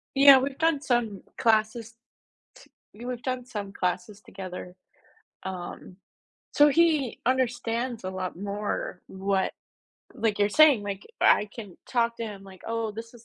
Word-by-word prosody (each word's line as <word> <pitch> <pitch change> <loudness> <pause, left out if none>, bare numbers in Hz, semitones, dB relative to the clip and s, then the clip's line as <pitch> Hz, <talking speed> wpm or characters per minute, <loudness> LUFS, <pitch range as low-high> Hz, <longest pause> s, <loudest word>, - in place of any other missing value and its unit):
Yeah, 275 -1 +9
we've 270 +1 -3
done 320 -3 +2
some 240 -8 0 0.2
classes 225 0 +1 0.6
t - - -17 0.2
y 230 - -10
we've 250 -1 -4
done 255 -1 -2
some 210 -5 -6
classes 185 +3 -3
together. 180 -2 -8 0.7
Um, 185 0 -7 0.6
so 295 0 +6
he 305 -5 +2
understands 240 -2 0
a 185 - -3
lot 185 -2 -4
more 200 -2 -4
what, 190 0 -1 0.6
like, 215 -2 0
you're 205 - +3
saying. 290 -4 +6
Like, 200 -1 -5
I 210 - +5
can 205 -6 -9
talk 235 -1 +1
to 230 - -2
him 205 -3 -7
like, 190 -1 -14
"Oh, 230 -1 -2
this 230 +2 -9
is 235 -1 -15
225 Hz, 150 wpm, -27 LUFS, 195-250 Hz, 0.7 s, Yeah